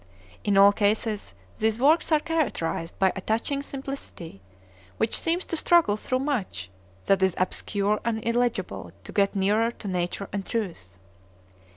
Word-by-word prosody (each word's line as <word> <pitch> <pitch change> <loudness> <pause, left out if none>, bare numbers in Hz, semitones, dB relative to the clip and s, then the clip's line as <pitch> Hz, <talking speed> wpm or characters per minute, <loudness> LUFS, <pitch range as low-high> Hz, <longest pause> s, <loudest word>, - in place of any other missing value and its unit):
In 200 -1 +2
all 200 +1 +8
cases 210 0 0 0.2
these 220 0 +1
works 310 +6 +4
are 310 - +5
characterized 290 - -2
by 190 -1 +3
a 190 - -4
touching 230 +8 0
simplicity, 270 - -8 0.6
which 225 - +1
seems 340 +2 0
to - - -3
struggle 330 -9 +4
through 255 +4 -1
much, 195 - -2 0.3
that 195 -1 +3
is 190 -2 +2
obscure 200 +3 0
and 225 -1 -1
illegible 225 - -1
to - - -9
get 200 0 +2
nearer 210 +4 +2
to 235 -3 -8
nature 180 +1 -2
and 200 -1 -2
truth. 170 - -4
210 Hz, 150 wpm, -26 LUFS, 190-245 Hz, 0.6 s, all